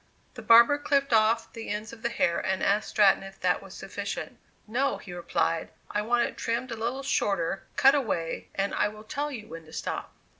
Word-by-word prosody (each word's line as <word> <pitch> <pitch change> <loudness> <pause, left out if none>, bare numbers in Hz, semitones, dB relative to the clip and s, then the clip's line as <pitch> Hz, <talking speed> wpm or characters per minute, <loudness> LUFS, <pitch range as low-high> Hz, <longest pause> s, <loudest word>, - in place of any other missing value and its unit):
The - - -9
barber 235 +5 +7
clipped 280 -3 +1
off 225 +1 +3
the 225 -1 -7
ends 215 +2 -4
of 225 - -12
the 235 - 0
hair, 170 -7 +1
and 190 0 -1
asked 205 +2 +2
Stratton 205 -3 +4
if 195 0 -11
that - - +2
was - - -12
sufficient. - - -6 0.3
"No," 255 +6 0
he 180 - -10
replied, 165 -1 -1 0.2
"I 210 - 0
want 240 +2 +2
it - - -10
trimmed 235 +2 -2
a - - -2
little 240 +5 -3
shorter; 195 -8 0
cut 270 0 +6
away, 215 - -1
and 200 +1 -1
I - - +2
will 215 +1 -9
tell 285 +7 -3
you 220 -6 -7
when 165 0 -9
to 160 - -16
stop." - - -4
220 Hz, 210 wpm, -28 LUFS, 195-240 Hz, 0.3 s, barber